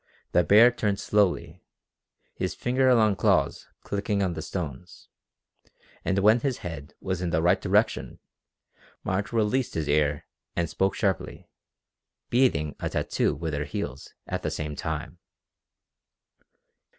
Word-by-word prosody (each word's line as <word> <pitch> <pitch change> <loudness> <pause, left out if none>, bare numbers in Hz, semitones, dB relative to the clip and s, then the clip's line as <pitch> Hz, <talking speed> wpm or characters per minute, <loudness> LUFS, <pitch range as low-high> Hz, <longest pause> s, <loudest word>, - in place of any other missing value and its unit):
The 90 - +4
bear 110 +9 +7
turned 105 -4 -1
slowly, 90 -4 +1 0.7
his 90 -2 -3
finger 130 +1 +2
long 110 -3 +4
claws - - +1 0.2
clicking 100 0 -1
on 90 -2 0
the 80 - -5
stones, 85 -1 -6 0.9
and 95 - 0
when 105 +4 +5
his 130 -1 -1
head 75 -4 -7
was 95 -2 -3
in 90 - -1
the 80 -1 +1
right 85 - +3
direction - - +1 0.9
Marge 95 +2 -2
released 115 +3 0
his 80 -3 -1
ear 75 -1 +1 0.3
and 85 -1 0
spoke 95 +6 0
sharply, 95 -4 -2 0.8
beating 120 - +2
a - - -2
tattoo - - 0
with 80 +1 -4
her 75 0 -2
heels 70 -4 -6
at - - -3
the - - -2
same 75 -1 -4
time. 80 +2 -5
90 Hz, 135 wpm, -26 LUFS, 80-105 Hz, 0.9 s, bear